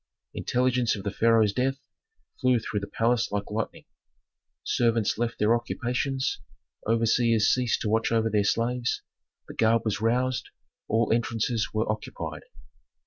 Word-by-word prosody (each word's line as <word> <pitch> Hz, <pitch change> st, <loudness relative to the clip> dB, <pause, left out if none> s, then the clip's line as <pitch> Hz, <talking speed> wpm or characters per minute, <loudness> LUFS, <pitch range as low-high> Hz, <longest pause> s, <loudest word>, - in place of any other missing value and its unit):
Intelligence 125 Hz, -2 st, +1 dB
of 100 Hz, -, -7 dB
the 100 Hz, -, -2 dB
pharaoh's 115 Hz, -2 st, +3 dB
death 135 Hz, +3 st, 0 dB, 0.6 s
flew 130 Hz, -2 st, +3 dB
through 110 Hz, -2 st, -3 dB
the 100 Hz, -, -6 dB
palace 115 Hz, +2 st, +1 dB
like 100 Hz, 0 st, -3 dB
lightning. 110 Hz, +1 st, -4 dB, 0.8 s
Servants 115 Hz, -3 st, +1 dB
left 120 Hz, 0 st, -1 dB
their 105 Hz, +2 st, +3 dB
occupations, 125 Hz, +3 st, -2 dB, 0.5 s
overseers 115 Hz, 0 st, +3 dB
ceased 125 Hz, -1 st, 0 dB
to 105 Hz, -, -1 dB
watch 110 Hz, +1 st, +1 dB
over 115 Hz, -1 st, +2 dB
their 105 Hz, -1 st, +2 dB
slaves, 120 Hz, +3 st, 0 dB, 0.4 s
the -, -, -8 dB
guard 115 Hz, 0 st, +2 dB
was 105 Hz, -1 st, -1 dB
roused; 125 Hz, +2 st, 0 dB, 0.4 s
all 110 Hz, 0 st, +2 dB
entrances 115 Hz, -1 st, 0 dB
were 110 Hz, +1 st, -1 dB
occupied. 110 Hz, 0 st, -4 dB
115 Hz, 140 wpm, -27 LUFS, 110-120 Hz, 0.8 s, pharaoh's